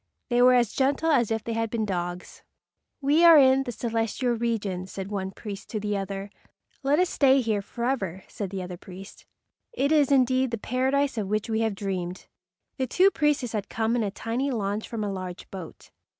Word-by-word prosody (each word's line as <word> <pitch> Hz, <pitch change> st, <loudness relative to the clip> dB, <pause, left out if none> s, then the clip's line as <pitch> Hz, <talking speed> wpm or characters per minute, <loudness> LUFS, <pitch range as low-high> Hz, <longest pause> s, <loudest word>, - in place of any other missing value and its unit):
They 240 Hz, 0 st, +3 dB
were 250 Hz, 0 st, +7 dB
as 240 Hz, -3 st, +2 dB
gentle 280 Hz, +4 st, +1 dB
as 240 Hz, -7 st, +3 dB
if 225 Hz, -1 st, -1 dB
they 230 Hz, -, -3 dB
had 225 Hz, 0 st, -1 dB
been 220 Hz, -1 st, -1 dB
dogs. 175 Hz, -2 st, -4 dB, 0.6 s
"We 290 Hz, +4 st, +3 dB
are 335 Hz, -2 st, +9 dB
in 265 Hz, -1 st, +5 dB
the 245 Hz, -, -3 dB
celestial 230 Hz, +1 st, -1 dB
regions," 205 Hz, -6 st, -2 dB
said 195 Hz, +1 st, -6 dB
one 190 Hz, -2 st, -2 dB
priest 200 Hz, 0 st, -8 dB
to 215 Hz, -, -3 dB
the 210 Hz, 0 st, -2 dB
other. 195 Hz, 0 st, -4 dB, 0.5 s
"Let 285 Hz, +1 st, +2 dB
us 365 Hz, +2 st, +3 dB
stay 270 Hz, -1 st, +4 dB
here 220 Hz, -5 st, 0 dB
forever," 200 Hz, -5 st, -3 dB
said 200 Hz, -3 st, -5 dB
the 190 Hz, -1 st, -4 dB
other 180 Hz, -1 st, -7 dB
priest. 190 Hz, +2 st, -12 dB, 0.4 s
"It 280 Hz, -, 0 dB
is 295 Hz, -3 st, +4 dB
indeed 260 Hz, -1 st, +3 dB
the 230 Hz, -, -2 dB
Paradise 260 Hz, +3 st, 0 dB
of 205 Hz, -, -2 dB
which 215 Hz, +2 st, -1 dB
we 220 Hz, -, +1 dB
have 220 Hz, -2 st, 0 dB
dreamed." 185 Hz, -2 st, -4 dB, 0.5 s
The 260 Hz, -2 st, -1 dB
two 375 Hz, +10 st, +4 dB
priests 295 Hz, -, +1 dB
had 205 Hz, -2 st, -3 dB
come 225 Hz, +1 st, 0 dB
in 240 Hz, -, +1 dB
a 210 Hz, -, 0 dB
tiny 230 Hz, +7 st, -2 dB
launch 210 Hz, -3 st, -2 dB
from 225 Hz, -2 st, -3 dB
a 205 Hz, -, -2 dB
large 185 Hz, -1 st, -7 dB
boat. 185 Hz, -4 st, -10 dB
225 Hz, 200 wpm, -26 LUFS, 195-260 Hz, 0.6 s, are